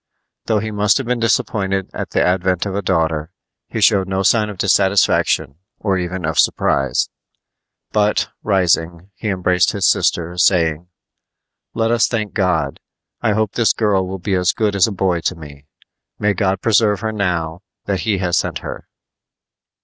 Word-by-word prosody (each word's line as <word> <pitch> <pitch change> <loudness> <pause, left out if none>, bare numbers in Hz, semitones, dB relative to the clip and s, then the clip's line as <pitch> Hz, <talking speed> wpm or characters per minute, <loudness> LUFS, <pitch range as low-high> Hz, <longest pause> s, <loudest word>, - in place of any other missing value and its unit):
Though 110 - +2
he 110 +1 -3
must 105 0 +2
have 135 - -3
been 125 0 -1
disappointed 95 -4 0
at - - -5
the - - +1
advent 90 0 +1
of 100 - -3
a 100 - -1
daughter, 80 -4 0 0.4
he - - -4
showed 95 -2 +4
no 95 0 -1
sign 105 +1 +3
of 105 - -8
dissatisfaction 95 -7 +2 0.2
or 100 -3 -1
even 90 0 -4
of 80 - -1
surprise; 70 -2 +1 0.8
but, 105 0 +1
rising, 90 -2 0
he 110 - -6
embraced 90 -2 +1
his - - +1
sister, 85 +1 +1
saying: 85 -2 +2 0.9
"Let 115 0 +1
us 120 -1 +3
thank 110 -3 -3
God. 90 -8 0 0.4
I 110 -3 +1
hope 110 -1 0
this 115 -2 +2
girl 100 -4 +1
will 95 +1 -5
be 95 +2 -3
as 90 -1 +2
good 105 -2 0
as 100 - +4
a - - -3
boy 95 -3 0
to 90 - -1
me. 75 -3 -13 0.5
May 105 0 +1
God 95 -1 -1
preserve 105 -3 +2
her 110 - -2
now 90 -5 -2 0.2
that 95 -2 -1
He 105 +2 0
has 90 -2 0
sent - - -1
her!" - - -7
95 Hz, 170 wpm, -18 LUFS, 90-105 Hz, 0.9 s, showed